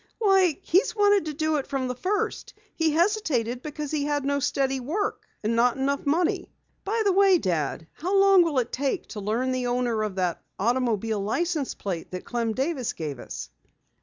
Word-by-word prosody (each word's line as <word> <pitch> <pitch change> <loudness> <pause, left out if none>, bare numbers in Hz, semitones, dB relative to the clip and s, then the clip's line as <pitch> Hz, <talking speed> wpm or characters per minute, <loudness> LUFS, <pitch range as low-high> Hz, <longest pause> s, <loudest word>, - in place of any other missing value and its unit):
"Why, 385 -7 +3
he's 375 +6 +2
wanted 410 -3 +4
to 305 - -3
do 310 +1 +1
it 275 - -3
from 265 -2 -2
the 250 - -2
first. 380 +11 -2 0.2
He 325 -1 +2
hesitated 310 - +1
because 300 0 -5
he 300 -2 0
had 290 -1 -1
no 280 0 +1
steady 270 -1 0
work, 335 +12 -3 0.2
and 220 +2 +1
not 240 +2 +3
enough 280 +2 -1
money. 330 +4 +1 0.3
By 440 +3 0
the 400 - +4
way, 390 -1 +5
Dad, 165 - -1
how 370 +5 -1
long 390 -1 +7
will 325 -5 +1
it 245 -2 0
take 275 0 -1
to 215 - -6
learn 225 +6 -1
the 255 -1 -1
owner 245 -2 0
of 210 -3 -2
that 180 -3 -1 0.2
automobile 225 -1 0
license 300 - -1
plate 180 -5 -4
that 180 0 -6
Clem 230 -2 -1
Davis 265 0 -1
gave 145 -5 -5
us?" - - -7
275 Hz, 190 wpm, -26 LUFS, 230-340 Hz, 0.3 s, long